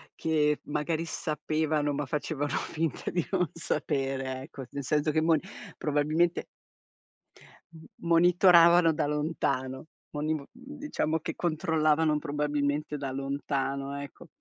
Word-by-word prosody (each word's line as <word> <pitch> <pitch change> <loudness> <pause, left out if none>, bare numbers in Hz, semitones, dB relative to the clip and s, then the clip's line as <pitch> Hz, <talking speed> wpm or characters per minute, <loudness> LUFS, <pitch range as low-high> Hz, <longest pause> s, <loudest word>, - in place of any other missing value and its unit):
che 150 -2 +1
magari 155 +2 -1
sapevano, 155 -1 -1
ma 145 +1 -2
facevano 145 0 -2
finta 160 -3 -2
di 175 -3 -1
non 180 -4 +1
sapere, 135 -5 -2
ecco. 140 -2 -9
Nel 140 0 -5
senso 150 +2 +1
che 155 - +2
mon 160 0 +4 0.4
probabilmente 155 +4 +1 1.3
m 160 -1 -13 0.2
monitoravano 170 0 +6
da 150 - 0
lontano, 145 -3 -1 0.3
moniv 155 +1 -1
mhmm, 260 +4 -12
diciamo 215 - -1
che - - -5
controllavano 155 -2 +2
probabilmente 150 0 -1
da 135 -2 -4
lontano, 140 0 -2
ecco. 140 - -10
150 Hz, 115 wpm, -29 LUFS, 145-165 Hz, 1.3 s, monitoravano